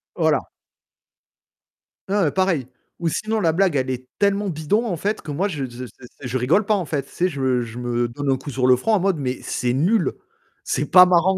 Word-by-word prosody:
Voilà. -, -, +1 dB, 1.6 s
Heu, 195 Hz, -6 st, +2 dB
pareil, 180 Hz, -9 st, 0 dB, 0.3 s
ou 170 Hz, -, 0 dB
sinon 215 Hz, +6 st, -1 dB
la 165 Hz, -4 st, +3 dB
blague 180 Hz, -1 st, +2 dB
elle 130 Hz, -1 st, 0 dB
est 130 Hz, 0 st, -4 dB
tellement 200 Hz, 0 st, +1 dB
bidon, 175 Hz, +9 st, 0 dB
en 185 Hz, -6 st, -1 dB
fait, 205 Hz, +6 st, -2 dB
que 150 Hz, -, -7 dB
moi 180 Hz, +8 st, 0 dB
je 145 Hz, -6 st, -3 dB
je 125 Hz, 0 st, -8 dB, 0.4 s
je 130 Hz, -1 st, -2 dB
rigole 150 Hz, -, +2 dB
pas, 215 Hz, -, +2 dB
en 185 Hz, -4 st, -2 dB
fait, 140 Hz, -3 st, -2 dB
tu -, -, -20 dB
sais, 180 Hz, -, 0 dB
je 140 Hz, -5 st, -6 dB
me 130 Hz, -2 st, +2 dB
je 115 Hz, 0 st, -9 dB
me 120 Hz, 0 st, -1 dB
donne 135 Hz, +4 st, -2 dB
un 130 Hz, -, +2 dB
coup 145 Hz, -, -9 dB
sur 130 Hz, -1 st, -1 dB
le 130 Hz, 0 st, +6 dB
front 220 Hz, -, 0 dB
en 210 Hz, -, +4 dB
mode: 190 Hz, -2 st, +1 dB
«Mais 130 Hz, -2 st, -2 dB
c'est 120 Hz, 0 st, -1 dB
nul, 175 Hz, -, +2 dB, 0.5 s
c'est 145 Hz, -, -1 dB
pas 180 Hz, 0 st, +9 dB
marrant». 180 Hz, +1 st, +3 dB
155 Hz, 220 wpm, -22 LUFS, 130-190 Hz, 1.6 s, pas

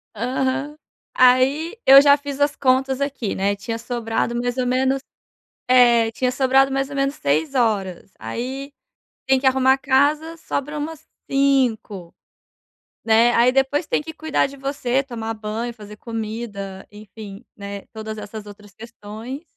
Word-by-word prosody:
Aham. 265 Hz, +5 st, -2 dB, 0.5 s
Aí 270 Hz, -, +4 dB
eu 270 Hz, +1 st, +10 dB
já 285 Hz, 0 st, +6 dB
fiz 285 Hz, -1 st, -7 dB
as 290 Hz, 0 st, +2 dB
contas 265 Hz, 0 st, +1 dB
aqui, 275 Hz, -7 st, -2 dB
né. 200 Hz, +1 st, 0 dB
Tinha 225 Hz, +3 st, -5 dB
sobrado 235 Hz, 0 st, -2 dB
mais 245 Hz, +1 st, -2 dB
ou 255 Hz, -, 0 dB
menos 265 Hz, +2 st, +1 dB, 0.7 s
É, 240 Hz, -3 st, +5 dB
tinha 255 Hz, +2 st, 0 dB
sobrado 265 Hz, +1 st, +3 dB
mais 270 Hz, 0 st, -1 dB
ou 280 Hz, -, -7 dB
menos 275 Hz, +1 st, 0 dB
6 155 Hz, -, 0 dB
horas. 200 Hz, -7 st, -1 dB
Aí 260 Hz, -, -5 dB, 0.6 s
tem 265 Hz, 0 st, +4 dB
que 265 Hz, -, +1 dB
arrumar 260 Hz, 0 st, +4 dB
a 270 Hz, -, -1 dB
casa. 290 Hz, +5 st, +1 dB
Sobra 295 Hz, -1 st, -4 dB
umas 315 Hz, +1 st, -6 dB, 0.2 s
5, 250 Hz, -10 st, 0 dB, 0.9 s
né. 225 Hz, +2 st, +5 dB
Aí 240 Hz, +2 st, +4 dB
depois 270 Hz, +4 st, +1 dB
tem -, -, 0 dB
que 320 Hz, +1 st, -8 dB
cuidar 315 Hz, -2 st, 0 dB
de 280 Hz, -, -12 dB
você, 275 Hz, -1 st, -1 dB
tomar 225 Hz, -4 st, -5 dB
banho, 220 Hz, +2 st, -5 dB
fazer 210 Hz, -2 st, -12 dB
comida. 215 Hz, -4 st, -6 dB
Enfim, 210 Hz, +1 st, -11 dB
né, 200 Hz, -1 st, -7 dB
todas 220 Hz, 0 st, -7 dB
essas 210 Hz, 0 st, -8 dB
outras 205 Hz, 0 st, -14 dB
questões. 230 Hz, -, -9 dB
250 Hz, 150 wpm, -21 LUFS, 220-275 Hz, 0.9 s, eu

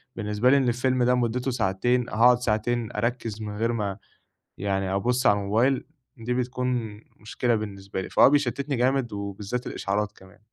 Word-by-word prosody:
بالنسبة 105 Hz, +2 st, +1 dB
لي 140 Hz, -, +6 dB
إن 130 Hz, -2 st, +2 dB
الفيلم 125 Hz, +1 st, +1 dB
ده 125 Hz, +1 st, +3 dB
مدته 125 Hz, +2 st, 0 dB
ساعتين 120 Hz, +4 st, 0 dB
هاقعد 120 Hz, +2 st, +5 dB
ساعتين 115 Hz, 0 st, -1 dB
أركز 115 Hz, -2 st, -3 dB
من 105 Hz, -1 st, -5 dB
غير 115 Hz, +2 st, 0 dB
ما 100 Hz, -4 st, -2 dB, 0.6 s
يعني 95 Hz, -1 st, -1 dB
أبُص 125 Hz, +6 st, 0 dB
على 105 Hz, 0 st, +5 dB
الموبايل 115 Hz, +7 st, +1 dB, 0.3 s
دي 120 Hz, +1 st, -3 dB
بتكون 125 Hz, -4 st, -2 dB, 0.2 s
مشكلة 115 Hz, +2 st, -1 dB
بالنسبة 100 Hz, -3 st, -4 dB
لي 95 Hz, -, -6 dB
فهو -, -, +6 dB
بيشتتني 140 Hz, 0 st, 0 dB
جامد، 125 Hz, -1 st, +1 dB
وبالذات 100 Hz, +4 st, -4 dB
الإشعارات 105 Hz, +1 st, -2 dB
كمان. 95 Hz, +2 st, -18 dB
115 Hz, 160 wpm, -25 LUFS, 105-125 Hz, 0.6 s, لي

